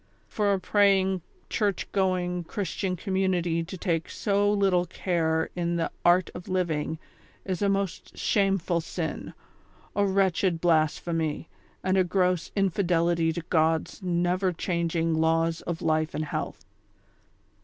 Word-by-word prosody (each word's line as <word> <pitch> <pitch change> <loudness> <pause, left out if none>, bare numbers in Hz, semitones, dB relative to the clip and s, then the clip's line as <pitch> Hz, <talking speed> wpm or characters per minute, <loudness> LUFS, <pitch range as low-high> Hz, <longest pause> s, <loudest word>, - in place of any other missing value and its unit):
for 205 -2 0
a 195 - +1
prajing, 190 -1 +3 0.3
church 205 -4 -1
going, 180 -2 0
Christian 190 0 -2
community 180 -3 0
to 185 +3 -8
take 165 -3 -1
so 205 0 +1
little 190 -3 +2
care 160 -3 0
in 170 -1 -1
the 165 -1 -1
" - - -37
art 175 +1 +4
of 175 - -9
living 165 -4 -1 0.2
" - - -31
is 185 -1 -3
a 200 - +3
most 195 -3 -2
shame 195 -2 +2
ful 170 -1 -1
sin, - - -5 0.6
a 205 - +3
wretched 190 -3 +2
blasphemy, 160 -1 +1 0.4
and 185 +1 +2
a 185 - +5
gross 180 -1 0
infidelity 175 -4 +2
to 170 - -4
God's 160 +3 +1
never 180 +1 +1
changing 170 -1 -1
laws 165 +1 +1
of 170 -1 -3
life 155 0 +1
and 155 - -1
health. - - -5
180 Hz, 140 wpm, -27 LUFS, 165-190 Hz, 0.6 s, a